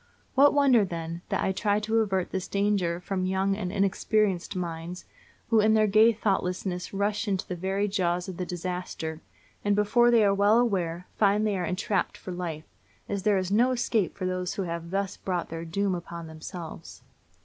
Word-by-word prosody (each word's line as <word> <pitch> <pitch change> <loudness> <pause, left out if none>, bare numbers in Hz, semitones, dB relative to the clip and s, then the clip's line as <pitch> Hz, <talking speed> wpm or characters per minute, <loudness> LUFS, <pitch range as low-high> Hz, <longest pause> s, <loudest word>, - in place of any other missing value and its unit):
What 280 +2 +6
wonder, 265 -6 +5
then, 170 -2 -5
that - - 0
I - - +1
try 205 +1 +1
to 220 +1 +1
avert 190 -4 0
this 190 -1 -3
danger 200 -4 0
from 185 0 -2
young 190 +1 +1
and 185 -3 -3
inexperienced 195 -1 +1
minds 170 0 -5 0.5
who 225 - +5
in 215 +1 +4
their 215 0 +4
gay 215 +3 +6
thoughtlessness 185 -4 -2
rush 205 +2 -1
into 190 -2 -1
the 180 - -3
very 190 +3 -1
jaws 180 -3 0
of 185 -2 -6
the 185 - -2
disaster, 175 -2 -4 0.4
and 205 0 +2
before 220 +4 +4
they 230 -3 +5
are 200 - +4
well 205 +3 +4
aware 180 -7 0
find 210 +1 +3
they 210 -2 +1
are 180 -2 -1
entrapped 185 +2 -1
for 185 - -8
life, 170 -3 -5 0.4
as 200 -1 -2
there 205 0 +3
is 185 0 -2
no 235 +5 +4
escape 235 -6 0
for 185 - -3
those 185 0 -2
who 195 - -2
have 170 -1 -5
thus 195 +1 -2
brought 180 -2 -3
their 165 +1 -5
doom 195 +4 0
upon 170 -1 -6
themselves. 160 +1 -9
190 Hz, 190 wpm, -27 LUFS, 180-210 Hz, 0.5 s, What